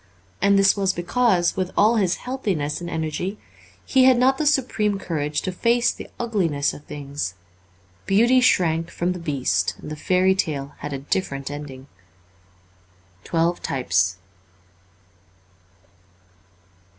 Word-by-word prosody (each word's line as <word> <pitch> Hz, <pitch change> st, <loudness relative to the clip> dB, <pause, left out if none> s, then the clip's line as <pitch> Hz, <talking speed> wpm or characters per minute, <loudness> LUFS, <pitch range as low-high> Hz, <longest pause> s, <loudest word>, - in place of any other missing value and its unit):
And 200 Hz, 0 st, +4 dB
this 195 Hz, 0 st, +5 dB
was 195 Hz, -2 st, +1 dB
because, 175 Hz, 0 st, +1 dB
with 185 Hz, -1 st, -1 dB
all 220 Hz, +3 st, +4 dB
his 190 Hz, -4 st, +2 dB
healthiness 195 Hz, -, -3 dB
and 170 Hz, -, -5 dB
energy, 165 Hz, +5 st, -3 dB, 0.5 s
he 260 Hz, -1 st, +4 dB
had 260 Hz, -1 st, +6 dB
not 265 Hz, +2 st, +3 dB
the 305 Hz, -, +1 dB
supreme 220 Hz, -8 st, +1 dB
courage 150 Hz, -5 st, -3 dB
to 185 Hz, -, -2 dB
face 235 Hz, +6 st, +2 dB
the -, -, -10 dB
ugliness 170 Hz, -12 st, 0 dB
of 145 Hz, -, -12 dB
things; 140 Hz, -10 st, -5 dB, 0.7 s
Beauty 240 Hz, +6 st, +4 dB
shrank 165 Hz, -8 st, +2 dB
from 175 Hz, +1 st, -2 dB
the 180 Hz, -, -5 dB
Beast 125 Hz, -, -1 dB
and -, -, -9 dB
the -, -, -4 dB
fairy 185 Hz, +4 st, +2 dB
tale 145 Hz, -6 st, -3 dB
had 145 Hz, -, -6 dB
a 140 Hz, -, -3 dB
different 140 Hz, -1 st, -3 dB
ending. 140 Hz, -3 st, -8 dB, 0.8 s
' 90 Hz, 0 st, -34 dB
Twelve 170 Hz, +1 st, 0 dB
Types.' 90 Hz, -8 st, 0 dB
170 Hz, 135 wpm, -23 LUFS, 140-200 Hz, 0.8 s, had